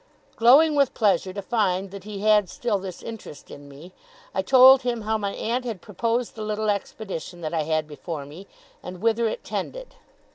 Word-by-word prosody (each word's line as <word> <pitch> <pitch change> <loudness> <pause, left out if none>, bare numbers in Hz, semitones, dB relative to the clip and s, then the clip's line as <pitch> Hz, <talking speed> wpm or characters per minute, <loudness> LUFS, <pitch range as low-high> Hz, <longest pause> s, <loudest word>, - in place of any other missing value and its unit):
Glowing 280 +7 +6
with 280 -3 +2
pleasure 195 -4 +1
to 200 +1 -6
find 195 -3 0
that 200 -1 -10
he 205 -2 -7
had 210 -3 +3
still 225 -5 -2
this 185 -2 -8
interest 220 -10 -10
in 145 0 -11
me, 150 +6 -13 0.4
I - - 0
told 260 0 +7
him 245 -2 -2
how 220 +1 -1
my 200 -2 -2
aunt 240 +3 -2
had 230 -6 -5
proposed 230 +5 -2
the 220 - -9
little 215 0 -1
expedition 195 -4 -6
that 155 0 -4
I 160 - +1
had 155 0 -1
before 150 0 -7
me, 165 +8 -12 0.3
and 180 0 -8
whither 230 +2 +1
it 220 - -4
tended. - - -6
210 Hz, 190 wpm, -24 LUFS, 180-230 Hz, 0.4 s, told